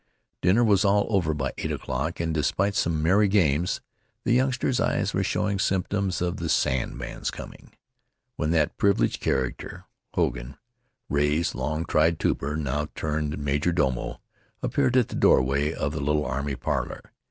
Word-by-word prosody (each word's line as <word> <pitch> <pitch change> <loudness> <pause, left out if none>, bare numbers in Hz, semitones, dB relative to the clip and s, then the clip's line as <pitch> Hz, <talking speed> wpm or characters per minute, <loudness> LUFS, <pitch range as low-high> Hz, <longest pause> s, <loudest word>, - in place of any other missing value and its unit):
Dinner 95 +7 +4
was 105 -3 +4
all 100 0 +3
over 90 -6 +2
by 70 -3 -2
eight - - -2
o'clock, - - -3
and, 80 -1 -1
despite 90 +6 +1
some 80 -6 0
merry 100 +5 +4
games, 90 -4 +2 0.4
the 120 - +2
youngsters' 130 0 +1
eyes - - 0
were - - +1
showing 100 -2 0
symptoms 95 -1 0
of 90 -1 -1
the - - -3
sandman's 65 -1 -1
coming, - - -10 0.6
when 75 - -1
that 80 -3 +1
privileged 100 -1 +2
character, 65 -2 -2 0.3
Hogan, - - -1 0.5
Ray's 75 +4 +1
long 75 +5 -2
tried 80 +2 +2
trooper 75 0 -1
now 75 0 -1
turned 75 -1 -2
major 70 +4 0
domo, 65 -7 -1 0.4
appeared 130 -3 +2
at 125 - +3
the - - -6
doorway 70 +4 +3
of - - -2
the - - -4
little 75 +1 +1
army 70 +2 -2
parlor. - - -3
80 Hz, 155 wpm, -26 LUFS, 70-100 Hz, 0.6 s, Dinner